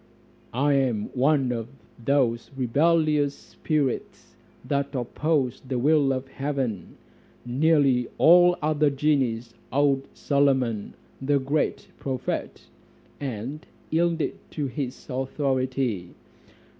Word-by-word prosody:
"I 140 +3 +3
am 125 -6 0
one 135 0 +2
of 115 -2 -3 0.4
those 120 -3 +1
rebellious 150 +2 +2
spirits 150 -5 -3 0.3
that 140 0 -1
opposed 130 0 -1
the 130 - 0
will 145 +1 +3
of 130 0 -2
heaven; 135 - -3 0.5
nearly 135 -1 +3
all 175 +2 +7
the 150 - -5
other 155 -1 +3
genies 130 -5 0 0.2
owned 140 -1 +2
Solomon, 130 -7 +1 0.3
the 140 +1 +2
great 140 +3 -1
prophet, 135 -4 -3 0.6
and 135 +3 -5 0.3
yielded 165 0 0
to 150 - -3
his 135 -1 -5
authority. 130 -6 -1
135 Hz, 100 wpm, -25 LUFS, 125-150 Hz, 0.6 s, all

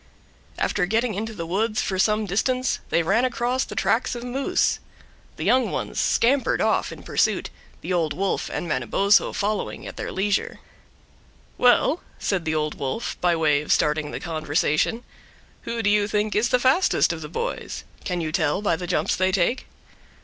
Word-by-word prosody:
After 180 -3 0
getting 225 +3 +1
into 220 +3 -4
the 170 -4 -5
woods 215 +6 0
for 190 -1 -1
some 215 +2 +2
distance 255 +7 0
they 170 - +2
ran 200 +9 +2
across 250 +1 0
the - - -8
tracks 240 +2 +1
of 240 - -6
moose. 255 +3 0 0.6
The - - -4
young 255 0 +3
ones - - -3
scampered 265 +3 +2
off - - +1
in - - -10
pursuit, - - 0 0.3
the 185 - -3
Old 165 -4 +1
Wolf 195 +5 -1
and 175 - -4
Manabozho 170 - +2
following 210 +1 -2
at - - -8
their - - -4
leisure. 195 +1 -1 1.0
"Well," 250 +6 +3 0.2
said 185 -5 -1
the 160 0 0
Old 150 -1 -1
Wolf, 135 - -3
by 175 -1 +3
way 150 -3 +2
of 150 - -4
starting 150 0 +2
the - - -5
conversation, 155 +7 0 0.6
"who 230 -1 -3
do 200 - +3
you 205 -1 +3
think 210 0 -1
is 220 +4 +2
the 250 - +4
fastest 260 +9 +3
of - - -7
the - - -7
boys? 470 +2 -4 0.2
Can 180 -2 -2
you 155 -1 -3
tell 160 +2 0
by 200 - +2
the 180 +2 -6
jumps - - +1
they 185 +1 +1
take?" 195 +8 0
200 Hz, 180 wpm, -24 LUFS, 165-235 Hz, 1.0 s, the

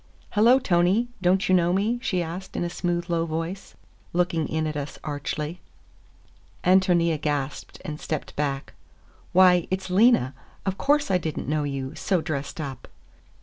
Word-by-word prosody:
"Hello, 230 +5 +6
Tony. 190 +1 +2
Don't 185 +1 +3
you 185 - +3
know 175 -1 +4
me?" 215 +6 +1
she 185 -8 0
asked 175 +3 -7
in - - -1
a 175 - -3
smooth, 175 -1 -2
low 170 -1 0
voice, 165 - -4 0.4
looking 170 -2 +1
in 160 0 -1
at 155 -1 -3
us 145 0 -5
archly. 150 +3 -4 1.0
Ántonia 175 -4 +3
gasped 145 -2 -3
and 150 0 -5
stepped 155 -3 -4
back. 140 -2 -2 0.6
"Why, 180 -2 +5
it's 190 0 -3
Lena! 195 - +4 0.3
Of 190 0 -2
course 290 -5 +2
I 180 - +3
did 160 -3 -4
n't - - -4
know 150 0 0
you, 135 -1 -4
so 185 +1 0
dressed 155 -2 -4
up!" 135 -5 -6
175 Hz, 160 wpm, -25 LUFS, 150-185 Hz, 1.0 s, Hello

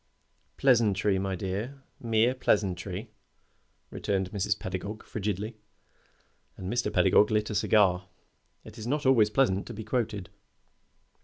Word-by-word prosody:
"Pleasantry, 105 -6 +3
my 95 0 -2
dear 105 +9 -4 0.2
mere 115 +1 +2
pleasantry," 100 -3 -1 0.8
returned 95 -2 -2
Mrs. 100 -2 0
Pedagog, 100 +4 -5
frigidly. 105 +1 -4 1.0
And 95 +2 -4
Mr. 120 -3 0
Pedagog 100 +3 +4
lit 105 0 0
a - - -2
cigar. 100 -3 +3 0.6
It 110 +1 -12
is 110 - -6
not 145 +3 -1
always 120 -5 +5
pleasant 105 -5 +1
to - - -7
be 110 - -6
quoted. 105 -5 -2
105 Hz, 125 wpm, -28 LUFS, 95-115 Hz, 1.0 s, always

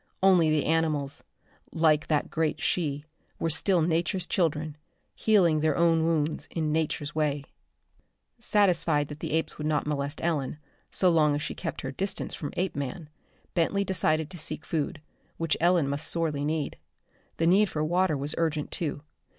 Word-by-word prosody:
Only 180 -4 +5
the 155 -1 +2
animals, 155 -3 0 0.5
like 155 -2 +3
that 150 -2 0
great 160 -1 0
she, 150 -4 -1 0.4
still 170 +3 +2
were 160 - +2
Nature's 170 +2 0
children, 155 -4 0 0.4
healing 180 -8 +3
their 155 -1 +1
own 165 -1 +4
wounds 155 -2 0
in 155 -2 -1
Nature's 150 -2 -1
way. 150 -2 0 1.0
Satisfied 175 -10 +2
that 150 0 -8
the - - -4
apes 160 -1 -1
would 150 - -2
not 155 -1 +1
molest 145 0 -2
Ellen, 150 -5 -1 0.3
so 185 -2 +3
long 150 -3 +4
as 145 - -3
she - - -3
kept - - -5
her 135 - -4
distance 190 +8 -3
from 145 - -5
Apeman, 150 -3 -3 0.4
Bentley 195 +4 +1
decided 160 -5 0
to 180 - -8
seek 155 - -5
food, 155 -1 -2 0.4
which 165 -2 +1
Ellen 170 -4 +4
must 140 +3 -2
sorely 155 -4 -1
need. 155 -1 -2 0.6
The 165 - +1
need 195 +4 +5
for 150 - -2
water 175 0 +2
was 140 +2 -2
urgent, 155 -3 -1
too. 150 -3 -2
155 Hz, 160 wpm, -28 LUFS, 150-170 Hz, 1.0 s, Only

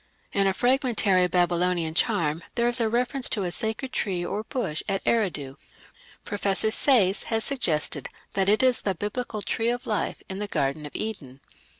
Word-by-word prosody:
In 200 -1 +3
a 190 - +2
fragmentary 235 -7 +3
Babylonian 175 -1 +1
charm 160 -1 +1
there 235 0 +2
is 240 0 +2
a 225 - +2
reference 250 +3 +1
to 205 - 0
a 175 - -2
sacred 220 +7 -1
tree 180 -4 -1
or 205 +4 -3
bush 230 - -2
at 195 0 -2
Eridu. 155 -12 0 0.7
Professor 205 0 0
Sayce 220 -6 +4
has 225 -1 -1
suggested 160 - 0 0.3
that 195 0 +1
it 215 +5 +3
is 255 -2 +3
the 195 -2 -1
Biblical 210 +2 -4
"Tree 225 +1 0
of 245 +1 -2
Life" 215 - -2
in 190 0 -5
the 210 - -3
Garden 145 -3 -1
of - - -14
Eden. 145 -12 -4
200 Hz, 175 wpm, -25 LUFS, 175-235 Hz, 0.7 s, Sayce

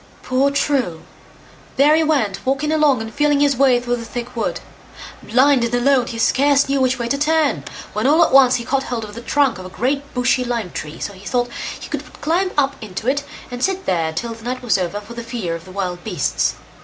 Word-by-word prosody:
Poor 260 +2 +2
True! 275 - 0 0.7
there 290 +3 +6
he 320 - +3
went 270 -11 0
walking 275 +3 0
along 295 -7 +3
and 225 - -8
feeling 295 0 +2
his 285 -1 +3
way 255 -1 +4
through 245 0 -2
the 230 - -6
thick 240 +1 -6
wood. 230 - -2 0.6
Blind 260 +2 +3
and 235 +1 0
alone, 255 0 +3
he 230 - -5
scarce 280 +4 +3
knew 275 0 +1
which 260 0 +2
way 235 -1 -3
to 280 +3 -1
turn, 300 - +2 0.3
when 215 +4 0
all 315 +4 +5
at - - -3
once 260 -2 +7
he 235 - -3
caught 275 +2 +1
hold 235 -2 -3
of 210 -1 -8
the 235 - -8
trunk 270 -5 +1
of 185 - -8
a - - -10
great 275 +8 -2
bushy 250 +1 +2
lime 235 -7 -3
tree, 150 +1 -6
so 200 - -4
he 190 0 -14
thought 245 +3 0 0.3
he - - -8
would - - -6
climb 350 +5 +1
up 275 -1 +2
into 215 +1 -6
it, 285 +2 +1 0.3
and 245 0 -5
sit 385 0 0
there 165 -3 0
till 230 +9 -4
the 225 0 -13
night 255 +1 -4
was 220 -5 +2
over 185 +3 -2
for 215 +3 -11
fear 230 -7 -4
of 165 +1 -7
the 185 - -12
wild 180 -2 -4
beasts. 180 -10 -1
250 Hz, 230 wpm, -20 LUFS, 220-280 Hz, 0.7 s, once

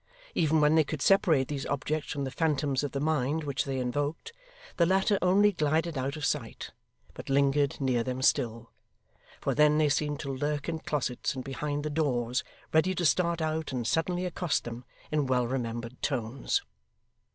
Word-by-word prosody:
Even 160 -1 +2
when 150 +1 +5
they 160 0 +5
could 150 0 -5
separate 170 -9 +4
these 140 -2 -4
objects 150 +2 -2
from 140 - -2
the 135 - -3
phantoms 145 -3 0
of 145 - -2
the 140 - -2
mind 155 0 0
which 140 -2 -1
they 135 -1 -2
invoked, 145 - -2 0.4
the 170 - +5
latter 190 +2 +2
only 200 +3 +5
glided 160 -1 0
out 135 +2 -2
of 150 - -3
sight, - - -3 0.4
but - - -9
lingered 140 +1 +2
near 130 -4 +1
them 130 +1 -3
still; 115 -2 +1 0.7
for - - -1
then 150 0 +4
they 155 -1 +3
seemed 145 +1 0
to 140 -3 -4
lurk 145 +2 -2
in 165 -1 -2
closets 135 -6 -2
and 130 - -4
behind 145 +2 -3
the 150 - -2
doors, 125 -5 0 0.3
ready 180 +4 +3
to 175 - -1
start 170 +2 +2
out 155 -1 -2
and 125 -3 -3
suddenly 175 +7 0
accost 175 -3 -1
them 120 +1 -7 0.3
in 150 -3 +1
well 125 -1 +2
remembered 120 -1 -4
tones. 135 - -1
145 Hz, 180 wpm, -29 LUFS, 130-160 Hz, 0.7 s, when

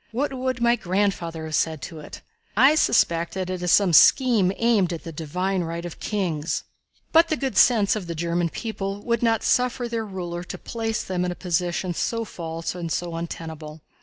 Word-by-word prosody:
What 270 +5 -1
would 255 -1 -2
my 235 0 +4
grandfather 180 -5 -1
have 155 - -7
said 160 0 +1
to 165 -3 -7
it? 150 - -10 0.3
I 265 +6 +7
suspect 170 - +2
that 185 -1 -3
it 185 -1 -4
is 180 -1 +1
some 195 -4 +4
scheme 225 - +6
aimed 220 -6 +2
at 165 - -6
the 165 - -7
divine 180 +5 -2
right 170 +1 -5
of 175 - -8
kings." 175 -7 -2 0.5
But 330 +1 +6
the 310 - -1
good 270 -2 -3
sense 220 -5 +5
of 200 -5 -5
the 170 - -4
German 170 +1 0
people 200 -1 -5
would 235 -1 0
not 225 -2 +2
suffer 250 0 +1
their 230 -1 -2
ruler 175 -4 -5
to - - -7
place 225 -1 -3
them 180 -1 -2
in 180 - -1
a - - -5
position 175 0 -1
so 230 +6 -2
false 165 -4 -5
and 170 -2 -5
so 175 0 -2
untenable. 160 -2 -7
185 Hz, 195 wpm, -24 LUFS, 170-225 Hz, 0.5 s, I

